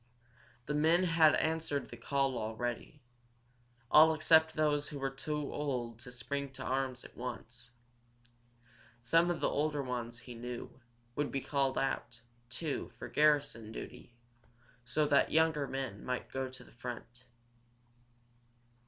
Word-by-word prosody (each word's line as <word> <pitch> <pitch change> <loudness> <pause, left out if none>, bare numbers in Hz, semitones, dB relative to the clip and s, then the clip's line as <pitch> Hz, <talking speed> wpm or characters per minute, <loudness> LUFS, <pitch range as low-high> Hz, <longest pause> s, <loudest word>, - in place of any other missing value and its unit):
The 150 - -2
men 160 +4 +4
had 165 -3 +5
answered 160 -3 0
the - - -9
call 135 +2 0
already, 120 +5 -4 0.9
all 160 +1 +8
except 160 0 +5
those 150 -1 +2
who 145 - -6
were 135 -1 -2
too 150 +1 -3
old 125 -6 -2
to 125 +1 -9
spring 140 +3 -3
to - - -6
arms 130 -1 -1
at - - -13
once. 120 -1 -7 1.3
Some 165 +8 +4
of 175 -2 0
the - - +3
older 150 -1 0
ones, 120 -2 -4
he 125 0 -10
knew, 120 +1 -6 0.4
would 145 -1 -1
be 135 - 0
called 135 -1 0
out, 120 -3 -1 0.3
too, 140 +4 -3
for - - -7
garrison 145 -7 +2
duty, 120 +1 -9 0.7
so 150 +5 +2
that 145 -1 +3
younger 160 -3 +3
men 130 -7 -4
might 125 0 -3
go 130 0 -2
to 130 - -11
the - - -18
front. 120 +1 -8
135 Hz, 140 wpm, -33 LUFS, 120-150 Hz, 1.3 s, all